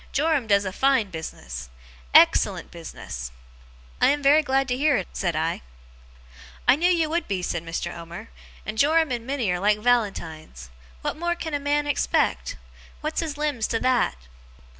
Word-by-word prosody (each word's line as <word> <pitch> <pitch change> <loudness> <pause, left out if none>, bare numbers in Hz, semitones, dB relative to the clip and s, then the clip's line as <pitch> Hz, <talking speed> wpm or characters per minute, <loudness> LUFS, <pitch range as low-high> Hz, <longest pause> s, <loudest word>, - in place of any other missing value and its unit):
Joram 290 -4 +1
does 200 -1 +3
a 190 - -2
fine 265 -5 +2
business. 65 - -7 0.4
Ex - - +7
cellent - - -4
business!' - - -7 0.7
'I - - +6
am 290 0 0
very 290 +3 +6
glad 270 -2 +1
to 250 - +1
hear 285 0 +3
it,' 185 - -4
said 175 -4 -1
I. 160 +2 -1 1.1
'I - - +7
knew 350 +3 +3
you 335 -3 +2
would 335 +3 -1
be,' 190 -3 -2
said 170 - -2
Mr. 170 +1 -4
Omer. 170 +6 -9 0.4
'And 215 0 -4
Joram 315 0 +3
and 240 -1 -3
Minnie 260 -8 0
are 180 - -1
like 205 +2 +3
Valentines. 170 - -1 0.3
What - - -2
more 345 +1 -1
can 320 -2 -5
a 290 - 0
man 290 +1 0
expect? 290 - 0 0.5
What's 310 +1 -2
his 310 -3 -3
limbs 290 -7 -1
to 225 - -1
that! 255 - +2
245 Hz, 175 wpm, -24 LUFS, 180-295 Hz, 1.1 s, Ex